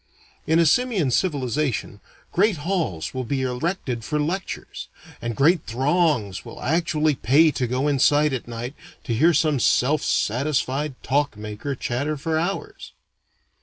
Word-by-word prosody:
In 160 - +3
a 170 - +5
simian 200 - +2
civilization, 135 - -1 0.3
great 200 0 +2
halls 160 - -2
will 130 -1 -3
be 130 +2 -2
erected 125 -1 -2
for 150 +5 -2
lectures, 175 +6 -4 0.3
and 115 -1 -3
great 155 - +3
throngs 130 - +1
will - - -10
actually 155 -1 +1
pay 145 +6 +4
to 130 -4 -2
go 130 +4 0
inside 145 +1 +3
at 130 - -4
night 120 +2 -5 0.3
to 135 -6 -2
hear 160 +10 +4
some 150 -2 +2
self 140 +5 +2
satisfied 135 +3 0
talk 140 -4 0
maker 105 +6 -5
chatter 140 +5 -2
for 160 +3 -1
hours. 185 +4 -4
145 Hz, 140 wpm, -23 LUFS, 125-160 Hz, 0.3 s, a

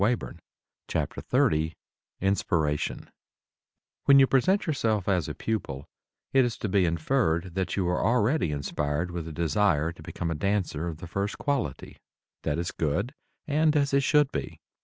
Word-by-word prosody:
[Illustration: 120 +3 -1 0.5
NW] 80 +1 0 0.5
INSPIRATION 80 -6 0 0.9
When 140 - +7
you 135 - +8
present 185 - +2
yourself 110 - 0
as 90 -6 +1
a - - -5
pupil 70 -11 -3 0.5
it 135 -1 +6
is 120 -2 -1
to - - -3
be 95 -1 +3
inferred 85 0 0
that 95 0 -1
you 95 -3 0
are 90 0 0
already 120 - +2
inspired 75 +3 -2
with 85 -2 -5
a - - -6
desire 80 0 +1
to 85 - -14
become 85 -2 -4
a - - +1
dancer 85 -2 -1
of 80 -2 -5
the 85 - -9
first 100 +5 -2
quality. 130 - -2 0.4
That 75 - -1
is 85 +1 -2
good 90 - -1 0.3
and 155 +1 +2
as 140 -2 +2
it 140 - +4
should 145 0 +3
be. - - -5
95 Hz, 160 wpm, -27 LUFS, 80-125 Hz, 0.9 s, you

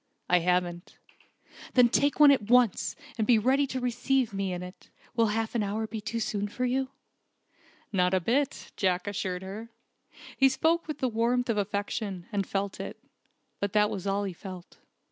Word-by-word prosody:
"I 180 - +4
haven't." 175 0 -1 0.8
"Then 250 -2 +7
take 285 +5 +1
one 295 -1 +9
at 220 -6 +1
once, 245 -5 +3 0.2
and 215 - +1
be 240 - +6
ready 265 +6 +2
to 260 - -3
receive 250 -1 0
me 195 -1 -2
in 180 0 -4
it. 180 +1 -12 0.3
Will 230 -1 +3
half 220 +1 -1
an 235 - +1
hour 210 +2 -1
be 220 0 -6
too 230 +2 -3
soon 205 -2 -1
for 250 +5 -3
you?" 260 +1 0 1.0
"Not 180 -1 +3
a - - +3
bit," 260 +10 -1
Jack 185 -1 +1
assured 190 -2 -3
her. 210 +4 -7 0.7
He 270 0 +5
spoke 320 +6 +1
with 305 - -4
the 260 - 0
warmth 240 +1 +1
of 215 - -2
affection, 200 -2 -3
and 200 -3 -1
felt 195 0 -2
it. - - -6 0.6
But 200 -1 -2
that 210 -1 +3
was 195 0 -4
all 200 +1 0
he 195 -2 -3
felt. 185 0 -10
215 Hz, 185 wpm, -28 LUFS, 195-250 Hz, 1.0 s, one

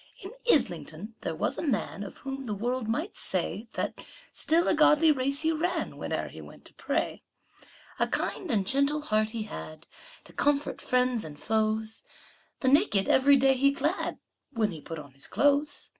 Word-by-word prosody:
In 385 - -7 0.2
Islington 175 - 0
there 160 - -3
was - - -1
a - - -1
man 225 -9 -1
Of 200 - -8
whom 270 0 -5
the 210 -3 -3
world 240 +3 -2
might 305 - -2
say - - -2
That - - -3 0.3
still 330 +2 +2
a - - +4
godly 310 0 +5
race 275 0 0
he 320 - +3
ran 325 +3 -1
Whene'er - - -4
he - - -10
went - - -14
to - - -13
pray. - - -2 0.8
A - - +3
kind 365 - -1
and 210 -7 +2
gentle 280 +6 +2
heart 215 -6 +1
he 225 -1 -4
had, 155 -6 -8 0.4
To - - -16
comfort 290 0 0
friends 250 -2 +1
and 150 -2 -9
foes; 220 +1 -1 0.6
The 260 - 0
naked 275 - +4
every 280 +2 +5
day 270 0 +4
he 275 +2 +3
clad 295 +6 -1 0.3
When 220 -6 0
he 160 -3 -8
put 165 - -7
on 145 -3 -10
his 135 0 -7
clothes. 290 +1 +1
255 Hz, 180 wpm, -28 LUFS, 215-290 Hz, 0.8 s, godly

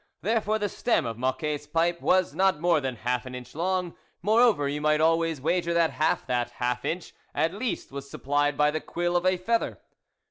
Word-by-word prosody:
There 220 +4 +2
fore 215 +1 0
the 205 -1 -1
stem 200 - 0
of 115 -1 -5
Mocquet's 145 +3 -2
pipe 170 +2 0
was 185 -1 +2
not 190 -4 +2
more 170 -2 +3
than 130 -2 -3
half 125 +1 -2
an 130 - -7
inch 125 -1 -9
long; 180 +1 -1 0.3
moreover 215 -7 +4
you 145 +1 -3
might 150 0 +3
always 165 -1 +2
wager 170 +3 0
that 165 -1 +3
half 155 +1 0
that 120 -1 -1
half 125 0 -2
inch 175 +1 -3 0.2
at 160 +4 +1
least 225 - -3
was 140 0 -7
supplied 145 +1 0
by 150 0 +4
the 155 0 -3
quill 175 0 -2
of 175 +1 +2
a 185 0 +3
feather. 230 +6 -1
160 Hz, 205 wpm, -27 LUFS, 140-180 Hz, 0.3 s, moreover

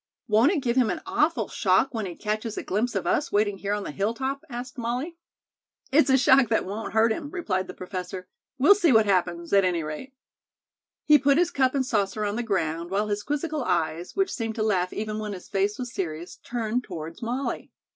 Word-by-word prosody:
"Won't 225 +7 +4
it 310 -8 -1
give 240 -1 0
him 245 -4 +4
an - - -3
awful 310 +3 +1
shock 205 +7 +2
when 220 -4 -2
he 175 - -7
catches 215 +2 -3
a - - -3
glimpse 220 +6 -1
of - - -1
us 295 - 0
waiting 205 -1 +1
here 200 +1 -2
on 205 - -4
the - - -5
hilltop?" 260 - -2
asked 245 0 -6
Molly. 250 +8 -3 0.8
"It's 300 +1 +4
a 265 - +6
shock 260 -2 +5
that 220 - +1
won't 205 +3 -5
hurt 220 +1 +4
him," 290 +5 -3
replied 200 - -2
the 185 - -8
professor. 185 0 -6 0.3
"We'll 290 +10 +7
see 355 -7 +3
what 220 -2 +5
happens, 175 -3 0
at 200 -1 +6
any 175 -3 +1
rate." 155 - -7 0.9
He 300 -1 +7
put 275 +1 +3
his 350 +1 +2
cup 265 -4 +2
and 265 -1 +1
saucer 210 -2 0
on 205 0 -1
the 240 - -1
ground, 170 -6 -1
while 205 +3 0
his 205 0 -1
quizzical 295 +3 -2
eyes, 170 -2 -1
which 385 -1 +1
seemed 225 -3 -3
to 215 - -1
laugh 185 -4 +1
even 215 0 -3
when 210 -1 -4
his 180 - -9
face 200 +1 0
was 245 -2 -6
serious, 170 -1 -5
turned 235 0 -2
toward 165 -5 -8
Molly. 245 +4 -3
220 Hz, 215 wpm, -26 LUFS, 190-260 Hz, 0.9 s, We'll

